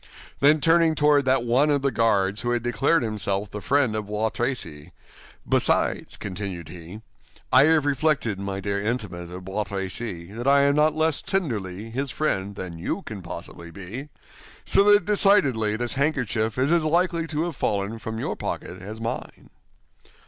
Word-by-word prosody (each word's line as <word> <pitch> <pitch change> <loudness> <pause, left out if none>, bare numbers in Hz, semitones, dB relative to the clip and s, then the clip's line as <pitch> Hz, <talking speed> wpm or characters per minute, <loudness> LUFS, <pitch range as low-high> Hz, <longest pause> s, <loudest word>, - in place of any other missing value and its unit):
Then 150 +2 +5
turning 165 +1 +4
toward 145 -2 +3
that 130 -1 +2
one 125 +5 +3
of 140 -2 +1
the 140 - +2
guards 105 -3 +1
who 120 - -2
had 120 -1 0
declared 125 +6 +2
himself 105 -2 -2
the 105 - -6
friend 135 -4 +1
of 105 -1 -3
Bois 105 +1 -1
Tracy, 90 - -4 0.5
"Besides," - - +1
continued 95 -4 -6
he, 90 +5 -10 0.5
"I 130 +2 +8
have 160 -2 +3
reflected, 140 -7 +1
my 100 0 -4
dear 100 0 -2
intimate 105 -7 -3
of 90 +1 -9
Bois 100 +3 -2
Tracy, 95 -2 -4
that 120 +4 -5
I 140 0 +6
am 140 0 +4
not 150 +1 +3
less 160 -1 +1
tenderly 110 - -3
his 135 +4 -2
friend 100 -9 -2
than 90 -4 -7
you 185 - -3
can 105 -3 -7
possibly 85 0 -8
be; 100 - -8 0.6
so - - +4
that 205 0 +5
decidedly 140 - +3
this 120 +1 -2
handkerchief 125 -6 0
is 135 +4 +1
as 170 -2 +3
likely 170 +1 +1
to 155 0 -1
have 170 -2 -4
fallen 100 +2 -2
from 110 0 -5
your - - -3
pocket 90 +1 -5
as 105 +3 -8
mine." 115 +2 -6
115 Hz, 170 wpm, -24 LUFS, 100-145 Hz, 0.6 s, I